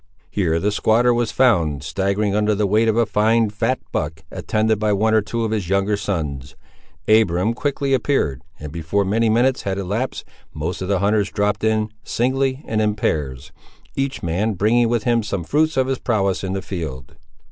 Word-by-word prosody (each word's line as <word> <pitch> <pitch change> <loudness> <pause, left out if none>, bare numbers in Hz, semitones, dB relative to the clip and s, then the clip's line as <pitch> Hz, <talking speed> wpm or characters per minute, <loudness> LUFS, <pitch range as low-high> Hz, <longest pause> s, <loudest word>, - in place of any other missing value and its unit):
Here 85 -4 +1
the 105 +4 0
squatter 115 +4 +3
was 120 -2 0
found, 85 - +2
staggering 100 +6 -1
under 105 0 +2
the 105 +1 +1
weight 110 +3 +2
of 110 0 +2
a 115 - +4
fine 110 +1 +2
fat 115 +5 0
buck, 80 +1 -3
attended 110 0 0
by 105 -1 +1
one 110 +2 +2
or 110 - +4
two 115 +3 -3
of 110 - -2
his 105 -6 -2
younger 100 +2 +1
sons. 75 -9 -4 0.5
Abiram 110 -1 +3
quickly 140 +1 -1
appeared, 115 - 0 0.2
and 75 -1 -7
before 85 +5 -1
many 110 +4 +1
minutes 125 +4 +2
had 95 -1 -3
elapsed, 105 +7 -3 0.3
most 80 +5 -4
of 95 - -3
the 100 0 +1
hunters 100 0 +2
dropped 105 0 -1
in, 110 0 +1
singly 130 +2 0
and 110 -1 0
in 105 -1 +1
pairs, 70 -8 -2 0.4
each 135 0 -2
man 95 +7 0
bringing 115 +5 +2
with 120 -2 0
him 120 -1 +2
some 100 -4 -3
fruits 155 - +1
of 130 - +3
his 130 -1 -2
prowess 100 -6 0
in 95 0 -2
the 95 -1 -3
field. 75 -8 -6
105 Hz, 190 wpm, -21 LUFS, 95-115 Hz, 0.5 s, a